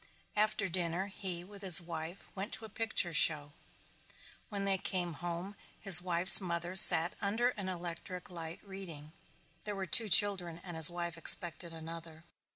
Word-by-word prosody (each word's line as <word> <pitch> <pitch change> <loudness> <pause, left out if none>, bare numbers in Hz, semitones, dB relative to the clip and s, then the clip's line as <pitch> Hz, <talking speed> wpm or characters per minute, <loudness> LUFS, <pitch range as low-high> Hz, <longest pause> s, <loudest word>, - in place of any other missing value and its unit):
After 210 -1 0
dinner 175 +1 -4
he, 190 -3 -6
with 200 +2 -15
his 190 -2 +7
wife, 170 +1 -9
went 200 +2 -7
to 220 - -7
a - - -12
picture 215 -5 -3
show. 150 -2 +1 1.0
When 200 -3 -5
they 195 -1 -1
came 180 -3 -4
home 175 +3 -6 0.2
his 185 -4 +8
wife's 180 +2 +4
mother 175 0 -6
sat 175 -2 +7
under 225 +4 -1
an 200 -6 -7
electric 180 +1 -8
light 165 -1 -9
reading. 180 -7 -11 0.5
There 210 -1 -6
were 195 -1 -5
two 230 -1 +3
children 190 -3 +1
and 175 -3 -9
his 160 0 +6
wife 170 -1 -7
expected 170 0 0
another. 165 0 -11
180 Hz, 160 wpm, -31 LUFS, 170-195 Hz, 1.0 s, his